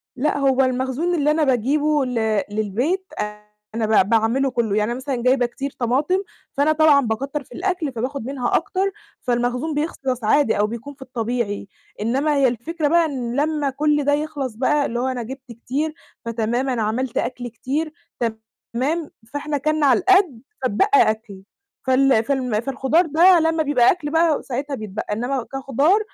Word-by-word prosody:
لأ، 285 Hz, +3 st, 0 dB
هو 270 Hz, -1 st, +3 dB
المخزون 260 Hz, +7 st, 0 dB
اللي 300 Hz, -2 st, +2 dB
أنا 310 Hz, +1 st, +2 dB
باجيبه 285 Hz, +3 st, +2 dB
ل 220 Hz, -4 st, 0 dB
للبيت، 235 Hz, -, -1 dB
آآ 210 Hz, 0 st, -5 dB, 0.3 s
أنا 225 Hz, -1 st, 0 dB, 0.2 s
ب 190 Hz, -, -9 dB
باعمله 230 Hz, +4 st, +2 dB
كُلّه، 230 Hz, -4 st, 0 dB
يعني 215 Hz, +2 st, +1 dB
أنا 240 Hz, -, -3 dB
مثلًا 260 Hz, -2 st, -3 dB
جايبة 255 Hz, 0 st, +3 dB
كتير 270 Hz, +3 st, -5 dB
طماطم، 270 Hz, +9 st, +1 dB, 0.4 s
فأنا 290 Hz, +2 st, +3 dB
طبعًا 310 Hz, -2 st, +5 dB
باكتّر 275 Hz, +5 st, -3 dB
في -, -, -28 dB
الأكل، 355 Hz, -6 st, -1 dB
فباخد 255 Hz, +1 st, -4 dB
منها 260 Hz, -2 st, -1 dB
أكتر، 390 Hz, 0 st, 0 dB, 0.3 s
فالمخزون 245 Hz, +5 st, -1 dB
بيخلص 270 Hz, -5 st, -2 dB
عادي 225 Hz, 0 st, +3 dB
أو 210 Hz, -, +3 dB
بيكون 235 Hz, +6 st, -7 dB
في 270 Hz, -, -27 dB
الطبيعي. 235 Hz, -5 st, -3 dB, 0.3 s
إنمّا 270 Hz, +7 st, +1 dB
هي 275 Hz, -2 st, +4 dB
الفكرة 295 Hz, +7 st, -2 dB
بقى 335 Hz, +2 st, +4 dB
إن 250 Hz, -5 st, -3 dB
لمّا 300 Hz, -2 st, 0 dB
كل 295 Hz, +2 st, +1 dB
ده 285 Hz, +1 st, +2 dB
يخلص 290 Hz, -5 st, -2 dB
بقى، 285 Hz, +4 st, +2 dB
اللي 240 Hz, +1 st, -2 dB
هو 255 Hz, -, 0 dB
أنا 255 Hz, -2 st, -2 dB
جِبت 260 Hz, +1 st, -9 dB
كتير، 270 Hz, +7 st, -3 dB, 0.3 s
فتمام 230 Hz, +3 st, -1 dB
أنا 245 Hz, -3 st, -1 dB
عملت 230 Hz, +3 st, -1 dB
أكل 245 Hz, -1 st, -2 dB
كتير، 285 Hz, +7 st, -3 dB, 0.8 s
تمام 295 Hz, +6 st, -1 dB, 0.2 s
فإحنا 290 Hz, +1 st, -2 dB
كَلنا 310 Hz, +2 st, +1 dB
على 255 Hz, -5 st, +5 dB
القد، 375 Hz, -, +3 dB, 0.2 s
فاتبقى 255 Hz, -, +1 dB, 0.2 s
أكل. 210 Hz, -3 st, -9 dB, 0.4 s
فال 260 Hz, -3 st, +4 dB
فالم 250 Hz, -4 st, 0 dB
فالخضار 270 Hz, +6 st, +1 dB
ده 340 Hz, +4 st, +5 dB
لمّا 325 Hz, 0 st, +1 dB
بيبقى 265 Hz, -5 st, +4 dB
أكل 300 Hz, -5 st, -4 dB
بقى 325 Hz, -2 st, +2 dB
ساعتها 275 Hz, +2 st, -3 dB
بيتبقّى، 215 Hz, -2 st, -5 dB
إنما 245 Hz, +3 st, -2 dB
كخضار 275 Hz, -, +2 dB
265 Hz, 170 wpm, -21 LUFS, 235-300 Hz, 0.8 s, طبعًا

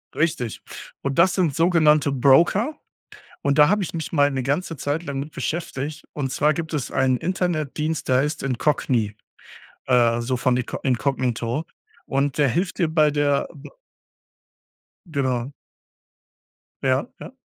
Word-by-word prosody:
Richtig. 155 Hz, -8 st, -1 dB, 0.4 s
Und, 140 Hz, +3 st, -2 dB
das 175 Hz, +2 st, +5 dB
sind 170 Hz, -7 st, +1 dB
sogenannte 155 Hz, -4 st, +4 dB
Broker. 170 Hz, -, +3 dB, 0.7 s
Und, 140 Hz, 0 st, +1 dB
da 150 Hz, 0 st, +7 dB
habe 210 Hz, -1 st, +2 dB
ich 175 Hz, -, -6 dB
mich 160 Hz, -2 st, -4 dB
mal 145 Hz, -3 st, +3 dB
'ne 130 Hz, -2 st, -2 dB
ganze 155 Hz, +4 st, -2 dB
Zeit 145 Hz, +5 st, -2 dB
lang 140 Hz, -4 st, -4 dB
mit 150 Hz, +3 st, -6 dB
beschäftigt. 155 Hz, -3 st, -4 dB
Und 135 Hz, -3 st, -3 dB
zwar, 150 Hz, +3 st, +2 dB
gibt 160 Hz, 0 st, -5 dB
es 140 Hz, -4 st, -2 dB
einen 130 Hz, -1 st, +2 dB
Internetdienst, 160 Hz, -3 st, -2 dB
der 130 Hz, -, +4 dB
heißt 150 Hz, +2 st, -2 dB
“Incogni“, 125 Hz, -5 st, 0 dB, 0.7 s
äh, 120 Hz, -2 st, +3 dB
so 125 Hz, +2 st, -1 dB
von 125 Hz, 0 st, +1 dB
Inco 125 Hz, -, -3 dB
Incognito. 125 Hz, 0 st, -1 dB, 0.4 s
Und, 140 Hz, +1 st, -1 dB
der 145 Hz, -2 st, +4 dB
hilft 175 Hz, +7 st, -1 dB
dir 170 Hz, -, +2 dB
bei 155 Hz, -2 st, +4 dB
der 145 Hz, -1 st, +1 dB
b 145 Hz, -, -11 dB, 1.4 s
Genau. 130 Hz, -3 st, -1 dB, 1.3 s
Ja, 130 Hz, -, +1 dB
ja? -, -, -10 dB
145 Hz, 145 wpm, -23 LUFS, 130-160 Hz, 1.4 s, da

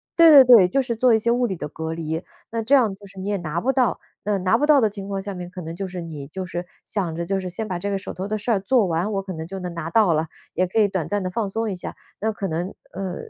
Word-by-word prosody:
对 335 Hz, -1 st, +8 dB
对 285 Hz, -4 st, +10 dB
对， 240 Hz, -7 st, +8 dB
就 185 Hz, -, 0 dB
是 245 Hz, -3 st, -1 dB
做 250 Hz, +2 st, +4 dB
一 -, -, +4 dB
些 230 Hz, +2 st, +1 dB
物 245 Hz, +1 st, +2 dB
理 190 Hz, -, -3 dB
的 165 Hz, -, -5 dB
隔 160 Hz, +2 st, -5 dB
离， 160 Hz, +1 st, -3 dB, 0.3 s
那 230 Hz, 0 st, -1 dB
这 245 Hz, +6 st, +4 dB
样 235 Hz, -7 st, +3 dB
就 195 Hz, +1 st, -15 dB
是 195 Hz, 0 st, -12 dB
你 190 Hz, -, -5 dB
也 205 Hz, -, 0 dB
拿 170 Hz, -2 st, -3 dB
不 265 Hz, +9 st, +1 dB
到， 255 Hz, -4 st, +2 dB, 0.3 s
那 205 Hz, -1 st, +1 dB
拿 190 Hz, +4 st, +2 dB
不 -, -, -1 dB
到 300 Hz, -2 st, +7 dB
的 225 Hz, -, +4 dB
情 200 Hz, -1 st, -6 dB
况 195 Hz, -1 st, -2 dB
下 200 Hz, +1 st, -5 dB
面 180 Hz, -1 st, -7 dB
可 185 Hz, -, -9 dB
能 165 Hz, +1 st, -6 dB
就 195 Hz, +2 st, -4 dB
是 180 Hz, -1 st, -6 dB
你 150 Hz, -4 st, -7 dB
就 185 Hz, +5 st, -5 dB
是 175 Hz, 0 st, -5 dB, 0.2 s
想 180 Hz, -6 st, -2 dB
着 170 Hz, +1 st, -3 dB
就 195 Hz, +2 st, 0 dB
是 185 Hz, -1 st, -4 dB
先 215 Hz, +5 st, -4 dB
把 180 Hz, -3 st, -3 dB
这 200 Hz, -, -3 dB
个 200 Hz, -, 0 dB
手 195 Hz, -, -7 dB
头 190 Hz, +2 st, -5 dB
的 215 Hz, +1 st, -1 dB
事 215 Hz, +3 st, -2 dB
儿 210 Hz, -, +3 dB
做 225 Hz, +3 st, +3 dB
完 175 Hz, +4 st, -1 dB
我 195 Hz, -1 st, -1 dB
可 190 Hz, -1 st, -6 dB
能 160 Hz, -1 st, -6 dB
就 195 Hz, +2 st, -6 dB
能 180 Hz, -2 st, -5 dB
拿 165 Hz, -1 st, -4 dB
到 210 Hz, -3 st, +4 dB
了， 160 Hz, +1 st, 0 dB, 0.3 s
也 185 Hz, -, +1 dB
可 205 Hz, +5 st, 0 dB
以 210 Hz, -, +5 dB
短 185 Hz, -5 st, -2 dB
暂 205 Hz, -1 st, -1 dB
地 185 Hz, -, -3 dB
放 210 Hz, +1 st, -1 dB
松 225 Hz, +1 st, -2 dB
一 -, -, -3 dB
下， 180 Hz, -, -7 dB, 0.3 s
那 220 Hz, +1 st, +1 dB
可 205 Hz, -2 st, -4 dB
能， 175 Hz, +3 st, -3 dB, 0.2 s
呃， 190 Hz, -2 st, -4 dB
195 Hz, 345 characters per minute, -23 LUFS, 175-220 Hz, 0.3 s, 对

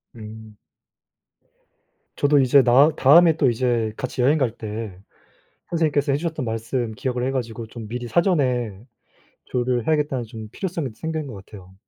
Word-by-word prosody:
음. 110 Hz, -1 st, -11 dB, 1.6 s
저도 145 Hz, 0 st, +3 dB
이제 135 Hz, +1 st, +5 dB
나 130 Hz, +5 st, +6 dB
다음에 160 Hz, +4 st, +6 dB
또 140 Hz, -5 st, +3 dB
이제 120 Hz, -2 st, 0 dB
같이 130 Hz, 0 st, -3 dB
여행갈 135 Hz, -1 st, +2 dB
때 105 Hz, -3 st, -6 dB, 0.7 s
선생님께서 150 Hz, -4 st, +1 dB
해 135 Hz, -, +2 dB
주셨던 160 Hz, -3 st, -3 dB
말씀 115 Hz, +1 st, -3 dB
기억을 125 Hz, +2 st, -3 dB
해 130 Hz, -, 0 dB
가지고 115 Hz, -3 st, -4 dB
좀 110 Hz, -1 st, -9 dB
미리 120 Hz, +2 st, -5 dB
사전에 125 Hz, -, +1 dB, 0.7 s
조율을 125 Hz, -1 st, -1 dB
해야겠다는 150 Hz, -5 st, 0 dB
좀 110 Hz, -1 st, -9 dB
필요성이 170 Hz, -7 st, -3 dB
생긴 160 Hz, +4 st, -4 dB
것 130 Hz, -, -8 dB
같아요. 95 Hz, -3 st, -14 dB
125 Hz, 310 characters per minute, -22 LUFS, 115-145 Hz, 1.6 s, 나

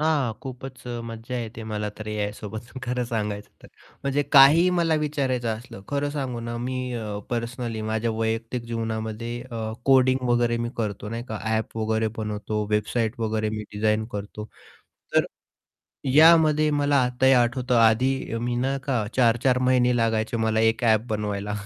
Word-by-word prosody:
हां, 150 Hz, -6 st, +1 dB
खूपच 130 Hz, -1 st, -8 dB
अ, 120 Hz, -1 st, -4 dB
मज्जा 115 Hz, +2 st, -6 dB
येते 115 Hz, -1 st, -6 dB
मला 105 Hz, -1 st, -3 dB
तर 110 Hz, -, -7 dB
एआयसोबत 105 Hz, +2 st, -5 dB
खरं 125 Hz, -1 st, -1 dB
सांगायचं 105 Hz, -3 st, -3 dB
तर. -, -, -14 dB, 0.3 s
म्हणजे 140 Hz, +1 st, +1 dB
काहीही 155 Hz, +6 st, +8 dB
मला 165 Hz, -2 st, +2 dB
विचारायचं 135 Hz, -5 st, -1 dB
असलं. 110 Hz, -4 st, -11 dB
खरं 145 Hz, 0 st, -1 dB
सांगू 135 Hz, -5 st, -3 dB
ना, 115 Hz, 0 st, -4 dB
मी 130 Hz, +1 st, -3 dB, 0.2 s
अ, 105 Hz, -3 st, -4 dB
पर्सनली 115 Hz, -1 st, -3 dB
माझ्या 110 Hz, +1 st, 0 dB
वैयक्तिक 115 Hz, +2 st, -2 dB
जीवनामध्ये 115 Hz, +1 st, -4 dB
अ, 110 Hz, -2 st, -4 dB
कोडिंग 130 Hz, -1 st, +5 dB
वगैरे 120 Hz, -1 st, +2 dB
मी 120 Hz, -, -3 dB
करतो 105 Hz, -2 st, -3 dB
नाही 115 Hz, +2 st, -5 dB
का 110 Hz, -1 st, -4 dB, 0.2 s
ॲप 110 Hz, +1 st, -3 dB
वगैरे 110 Hz, 0 st, 0 dB
बनवतो, 105 Hz, 0 st, -3 dB
वेबसाईट 110 Hz, +2 st, 0 dB
वगैरे 110 Hz, -1 st, 0 dB
मी 105 Hz, 0 st, -4 dB
डिझाईन 110 Hz, +1 st, +1 dB
करतो. 105 Hz, +1 st, -6 dB, 0.7 s
तर -, -, +5 dB, 0.9 s
यामध्ये 155 Hz, -1 st, +6 dB
मला 145 Hz, 0 st, +3 dB
आताही 130 Hz, +2 st, +3 dB
आठवतं 125 Hz, 0 st, +2 dB
आधी 115 Hz, +4 st, +4 dB, 0.2 s
अ, -, -, -1 dB
मी 120 Hz, +1 st, -2 dB
ना 135 Hz, +3 st, 0 dB
का 125 Hz, -7 st, 0 dB
4-4 125 Hz, +1 st, +3 dB
महिने 125 Hz, -1 st, +3 dB
लागायचे 115 Hz, 0 st, 0 dB
मला 110 Hz, 0 st, +1 dB
एक 115 Hz, +2 st, -9 dB
ॲप 110 Hz, -2 st, +4 dB
बनवायला 105 Hz, -1 st, -2 dB
115 Hz, 160 wpm, -25 LUFS, 110-130 Hz, 0.9 s, काहीही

